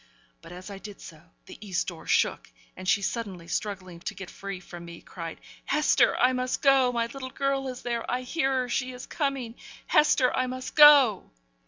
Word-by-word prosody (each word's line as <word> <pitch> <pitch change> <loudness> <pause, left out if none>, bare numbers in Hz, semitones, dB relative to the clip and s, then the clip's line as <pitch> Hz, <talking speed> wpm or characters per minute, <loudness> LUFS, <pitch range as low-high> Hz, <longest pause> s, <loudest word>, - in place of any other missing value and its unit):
But 165 0 -13
as 180 +3 -9
I 195 - -8
did 205 0 -10
so 160 -2 -12 0.2
the - - -12
east 190 -4 -2
door - - -11
shook, - - +1 0.3
and 185 0 -9
she, 200 - +2
suddenly 195 -5 -4
struggling 185 -1 -4
to 205 - -6
get 190 -2 -9
free 195 -1 -7
from 175 -1 -11
me, 170 0 -10
cried, 165 -2 -8 0.3
'Hester! 300 +2 +3
I 255 +1 +3
must 255 0 -2
go. 270 -2 +5
My 235 -1 0
little 260 +2 -7
girl 275 0 -1
is 255 -1 -7
there! 235 -1 -3
I 250 +1 -1
hear 270 +1 -1
her; 250 - -4
she 250 +1 -2
is 250 - -9
coming! 275 -6 -3 0.3
Hester, 270 -4 +3
I 255 - 0
must 255 +1 -6
go!' 285 -9 +7
240 Hz, 195 wpm, -27 LUFS, 190-260 Hz, 0.3 s, go